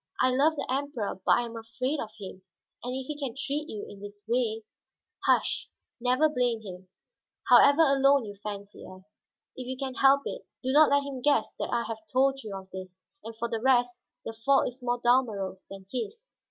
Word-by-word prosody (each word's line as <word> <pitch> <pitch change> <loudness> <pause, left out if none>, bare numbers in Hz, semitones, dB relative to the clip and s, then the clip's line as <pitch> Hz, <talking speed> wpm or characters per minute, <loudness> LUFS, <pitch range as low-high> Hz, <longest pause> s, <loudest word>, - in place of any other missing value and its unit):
I 255 - +4
love 290 +5 +3
the - - -3
Emperor, 260 -8 -3
but - - +5
I - - +1
am 230 0 -8
afraid 255 +6 -3
of 220 - -4
him. 190 -2 -9 0.4
And 250 +1 -3
if 265 0 -4
he 300 - -4
can 265 -5 -4
treat 290 +3 -3
you 210 -2 -5
in 200 - -12
this 205 0 -10
way 225 -2 0 0.3
" - - -18
"Hush; - - +2 0.3
never 255 +5 +3
blame 245 -6 0
him, 185 -2 -10 0.6
however 285 +3 +7
alone 275 -2 +4
you 205 -1 -8
fancy 205 -1 -7
us. 185 +2 -14 0.4
If 255 -1 -7
you 260 0 -4
can 265 -1 -3
help 275 +1 +5
it, - - -5 0.2
do 260 - 0
not 300 +2 +6
let 285 0 +3
him 275 -2 -6
guess 285 -5 +2
that - - -2
I 235 -1 +1
have 225 -1 -5
told 270 +1 +2
you 205 -4 -6
of 190 0 -12
this. 185 0 -9 0.2
And 225 +1 -8
for 235 - -2
the 225 -1 -3
rest, 245 -1 +2 0.2
the 225 - -4
fault 250 +5 +2
is 250 +2 -15
more 245 0 -1
Dalmorov's 220 -7 +1
than 195 -1 -10
his." 420 - -5
245 Hz, 205 wpm, -28 LUFS, 215-270 Hz, 0.6 s, however